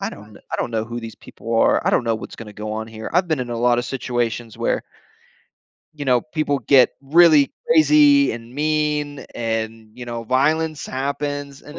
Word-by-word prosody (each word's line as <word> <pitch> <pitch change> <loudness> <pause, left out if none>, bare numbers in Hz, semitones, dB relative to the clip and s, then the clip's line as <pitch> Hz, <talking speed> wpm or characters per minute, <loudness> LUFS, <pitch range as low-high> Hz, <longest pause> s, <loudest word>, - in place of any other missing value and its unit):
"I - - -3
don't 105 +1 -13
know - - -15
I - - 0
don't - - -2
know 110 -1 -1
who 120 +1 -6
these 115 -1 -8
people 115 0 -7
are. 115 - +3
I - - +4
don't - - +2
know 115 -1 +1
what's - - -9
gonna 105 -2 -10
go 105 +1 -6
on 110 +1 -4
here." 110 0 -8
I've 180 +1 +2
been 155 -5 0
in 120 - -4
a 120 - -3
lotta 120 0 +2
situations 120 -3 -3
where - - 0 1.1
you 145 -2 -7
know, 125 -2 +3
people 155 -1 -2
get 135 -3 +5
really 150 0 +5 0.2
crazy 150 -3 +5
and 115 +1 -9
mean 150 -1 -1
and, 110 -1 -3
you 125 0 -8
know, 120 -1 -5
violence 155 +4 0
happens, 140 +1 -4
and 150 - -11
130 Hz, 200 wpm, -21 LUFS, 115-145 Hz, 1.1 s, get